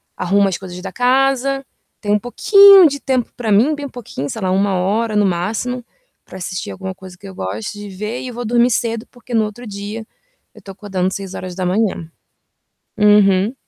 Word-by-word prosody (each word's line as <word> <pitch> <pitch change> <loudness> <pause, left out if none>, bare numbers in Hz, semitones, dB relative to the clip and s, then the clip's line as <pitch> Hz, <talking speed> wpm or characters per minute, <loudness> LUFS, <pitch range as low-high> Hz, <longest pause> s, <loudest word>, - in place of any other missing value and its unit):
arrumo 200 +2 +2
as 190 - -2
coisas 180 -2 -9
da 195 - -6
casa. 270 +2 +1 0.4
Tenho 205 -1 +1
um - - +1
pouquinho 395 - +7
de 285 -1 -3
tempo 260 -3 -1
pra 230 -4 -3
mim, 230 +10 +4
bem 290 -1 -6
pouquinho, 195 - -6
sei 220 - -6
lá, 185 -1 0
1 195 +1 +1
hora 210 +5 0
no 210 -1 +3
máximo, 210 +8 -2 0.4
pra - - -11
assistir 185 0 -5
alguma 190 0 -6
coisa 185 -1 -13
que 200 - -12
eu 190 - -10
goste 105 - -5
de 205 0 -8
ver. 210 +5 -5
E 255 - -6
vou 240 0 -6
dormir 240 +2 +3
cedo, 230 0 -1
porque 245 0 -12
no 220 -2 +3
outro 215 +4 -8
dia 210 +1 -6 0.5
eu - - -16
tô 195 - -10
acordando 190 -2 -3
06:00. 185 -1 -3 0.9
Uhum. 205 0 +4
210 Hz, 185 wpm, -18 LUFS, 190-245 Hz, 0.9 s, pouquinho